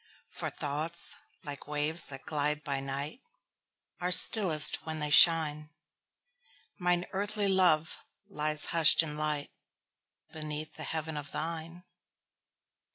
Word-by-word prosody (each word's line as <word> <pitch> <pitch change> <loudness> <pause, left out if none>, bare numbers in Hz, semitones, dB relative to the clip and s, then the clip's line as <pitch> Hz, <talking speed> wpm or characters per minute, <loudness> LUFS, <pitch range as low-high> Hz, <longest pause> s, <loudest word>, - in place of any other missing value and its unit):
For - - -5
thoughts, 155 +4 -1 0.3
like 145 -2 -10
waves 150 +3 -2
that 135 -1 -9
glide 150 0 -2
by 140 -2 -4
night, 140 - -6 0.8
Are 180 +1 -3
stillest 175 -5 +6
when 160 -1 -6
they 150 -1 -4
shine; 150 -2 +4 1.1
Mine 180 -1 -1
earthly 205 +1 -3
love 180 -5 +1 0.3
lies 150 -5 +2
hush'd 165 -1 +6
in 150 -2 -6
lightBeneath 150 0 -8
the 155 - -7
heaven 160 0 -5
of 145 -1 -8
thine. 165 +2 -7
155 Hz, 110 wpm, -28 LUFS, 150-170 Hz, 1.1 s, stillest